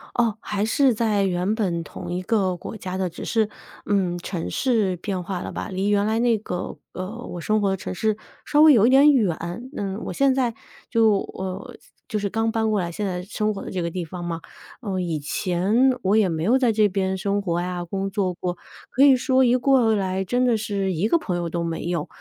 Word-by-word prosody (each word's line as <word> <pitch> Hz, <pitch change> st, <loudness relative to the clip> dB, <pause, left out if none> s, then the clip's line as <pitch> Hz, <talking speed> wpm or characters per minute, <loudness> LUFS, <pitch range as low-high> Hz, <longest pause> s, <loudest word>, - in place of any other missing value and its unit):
哦， 230 Hz, -3 st, +1 dB
还 205 Hz, -1 st, -2 dB
是 255 Hz, +4 st, +3 dB
在 215 Hz, -2 st, +1 dB
原 185 Hz, +3 st, 0 dB
本 180 Hz, -7 st, -1 dB
同 175 Hz, +3 st, -8 dB
一 180 Hz, -, -2 dB
个 190 Hz, -2 st, +1 dB
国 180 Hz, -, -8 dB
家 185 Hz, -2 st, -5 dB
的， 190 Hz, -1 st, -1 dB
只 170 Hz, -, -8 dB
是， 220 Hz, -2 st, +1 dB, 0.4 s
嗯， 190 Hz, -4 st, +1 dB
城 175 Hz, -1 st, -4 dB
市 220 Hz, -8 st, +1 dB
变 185 Hz, 0 st, -3 dB
化 180 Hz, 0 st, -4 dB
了 -, -, -5 dB
吧， -, -, -5 dB
离 195 Hz, 0 st, -1 dB
原 205 Hz, 0 st, +2 dB
来 220 Hz, +1 st, +1 dB
那 235 Hz, -1 st, +3 dB
个， 180 Hz, -4 st, -5 dB, 0.2 s
呃， 185 Hz, -, -4 dB, 0.2 s
我 175 Hz, -, -6 dB
生 215 Hz, +5 st, +1 dB
活 200 Hz, -1 st, +1 dB
的 -, -, +1 dB
城 185 Hz, -, -6 dB
市， 215 Hz, +3 st, 0 dB, 0.3 s
稍 295 Hz, -, +3 dB
微 310 Hz, 0 st, +9 dB
有 230 Hz, -5 st, +6 dB
一 -, -, +5 dB
点 275 Hz, +3 st, +7 dB
远。 215 Hz, -, +2 dB, 0.4 s
嗯， 195 Hz, +1 st, -3 dB
我 -, -, -4 dB
现 275 Hz, -1 st, +3 dB
在 250 Hz, -3 st, 0 dB, 0.4 s
就 225 Hz, -3 st, +4 dB, 0.2 s
呃， 190 Hz, +6 st, -6 dB, 0.3 s
就 220 Hz, -, -2 dB
是 200 Hz, -1 st, -1 dB
刚 225 Hz, +2 st, 0 dB
搬 220 Hz, -1 st, 0 dB
过 210 Hz, -, +2 dB
来 175 Hz, -2 st, -2 dB
现 205 Hz, +5 st, -4 dB
在 180 Hz, -2 st, -2 dB
生 215 Hz, +2 st, -1 dB
活 200 Hz, -, -6 dB
的 -, -, -7 dB
这 185 Hz, -, -3 dB
个 170 Hz, 0 st, -2 dB
地 180 Hz, 0 st, -3 dB
方 175 Hz, +2 st, -7 dB
嘛， 170 Hz, -1 st, -3 dB, 0.4 s
嗯， 190 Hz, -6 st, -2 dB
以 165 Hz, -3 st, -2 dB
前 180 Hz, +6 st, -1 dB, 0.3 s
我 195 Hz, +2 st, +2 dB
也 215 Hz, -4 st, +4 dB
没 160 Hz, -1 st, -2 dB
有 240 Hz, +6 st, +4 dB
在 250 Hz, -3 st, +3 dB
这 215 Hz, -1 st, +4 dB
边 190 Hz, -1 st, -1 dB
生 200 Hz, +1 st, 0 dB
活 175 Hz, -3 st, -1 dB
呀、 180 Hz, 0 st, -3 dB
工 195 Hz, +3 st, -3 dB
作 195 Hz, -2 st, -1 dB
过， 175 Hz, 0 st, -3 dB, 0.3 s
可 265 Hz, -, +3 dB
以 275 Hz, -2 st, +7 dB
说 260 Hz, 0 st, +3 dB
一 250 Hz, 0 st, +4 dB
过 250 Hz, -3 st, +3 dB
来， 190 Hz, -1 st, -1 dB
真 245 Hz, +6 st, +1 dB
的 245 Hz, -2 st, +3 dB
是 200 Hz, -3 st, -1 dB
一 180 Hz, +6 st, 0 dB
个 335 Hz, -, +4 dB
朋 200 Hz, -, -3 dB
友 175 Hz, -1 st, -2 dB
都 170 Hz, +1 st, -2 dB
没 165 Hz, -1 st, -3 dB
有。 170 Hz, -3 st, -2 dB
200 Hz, 250 characters per minute, -23 LUFS, 180-225 Hz, 0.4 s, 微